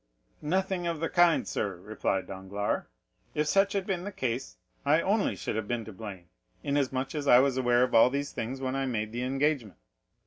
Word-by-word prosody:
"Nothing 185 +2 0
of 165 -2 -2
the 165 - -1
kind, 175 -2 +4
sir," 100 -3 -2
replied 95 0 -2
Danglars: 100 +2 -3 0.5
"if 150 - +1
such 195 +5 +3
had 195 -2 -1
been 185 -3 -2
the 205 - -5
case, 130 -6 -3 0.3
I 150 +3 +4
only 200 +4 +1
should - - -4
have 110 -1 -2
been 120 -1 -2
to 110 - -9
blame, 95 -4 -8 0.4
inasmuch 135 -2 0
as 145 -2 -3
I 125 - +8
was 135 0 +4
aware 125 -1 +3
of 125 - -1
all 115 +2 +7
these 140 +2 -2
things 125 +4 -4
when 130 0 -2
I 135 0 -1
made 110 -3 -2
the 120 +2 -3
engagement. 135 -3 0
130 Hz, 200 wpm, -29 LUFS, 110-155 Hz, 0.5 s, I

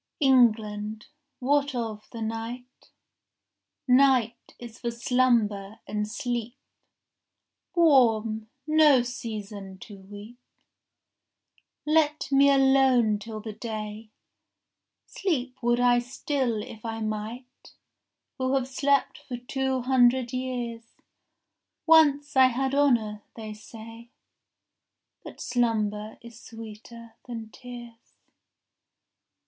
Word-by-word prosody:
14 270 -3 +5
England, 215 -3 +1 0.3
what 285 +1 +1
of 220 -3 -5
the 230 -2 -5
night?— 230 +3 -7 1.0
Night 250 -3 +3
is 235 -1 -11
for 240 - -2
slumber 230 -4 +1
and 210 0 -2
sleep, 240 +1 -4 1.2
Warm, 225 -9 +3 0.2
no 305 -4 +5
season 210 -5 -7
to 200 +1 -12
weep. 205 +5 -12 1.5
Let 305 -1 +1
me 275 +1 +5
alone 265 -5 +4
till 215 0 -7
the 215 0 -7
day. 215 -1 -6 1.0
Sleep 265 -10 -2
would 240 0 +2
I 245 0 +4
still 245 -2 -2
if 220 - -11
I 225 -1 -4
might, 220 +4 -6 0.6
Who 260 +1 +1
have 260 -2 0
slept 280 +1 0
for 245 - -7
two 265 +1 -2
hundred 250 -1 +3
years. 245 -3 -5 0.9
Once 295 -3 +4
I 260 -1 +7
had 265 +2 -1
honour, 235 -7 +2
they 220 -2 -7
say; 225 +2 -12 1.1
But - - -11
slumber 215 -3 -1
is 235 -1 -12
sweeter 225 +1 -11
than 225 -2 -7
tears. 240 -2 -12
240 Hz, 100 wpm, -26 LUFS, 220-260 Hz, 1.5 s, I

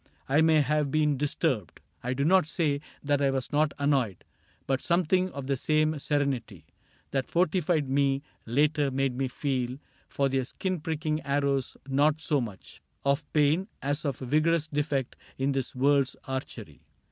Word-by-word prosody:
I 145 +4 +4
may 160 -1 +5
have 150 +1 +1
been 150 0 +2
disturbed, 135 - -1 0.2
I 125 +1 -2
do 140 +2 0
not 185 -1 +4
say 150 -4 0 0.2
that 145 -1 +1
I 140 - +3
was 135 -2 -2
not 150 0 +2
annoyed, 135 - 0 0.4
But 135 -1 0
something 185 +2 +2
of 140 -5 -7
the 135 +1 0
same 155 +2 +1
serenity 140 -4 -1 0.5
That 135 -2 -1
fortified 170 -3 +1
me 135 0 +1 0.2
later 145 +4 +2
made 135 -1 0
me 135 +1 0
feel 130 -1 -2 0.3
For 140 - +1
their 135 -1 0
skin 185 +5 -3
pricking 155 0 -2
arrows 140 -2 0
not 145 +3 +2
so 150 -3 +1
much 105 -5 -8 0.2
Of 140 +2 0
pain 155 +5 +2
as 145 +2 -2
of 140 -4 -2
a - - -3
vigorous 155 +4 +2
defect 145 -3 -2 0.2
In 135 +1 +1
this 135 -2 -2
world's 135 +1 +2
archery. 130 -1 -6
145 Hz, 160 wpm, -28 LUFS, 135-155 Hz, 0.5 s, may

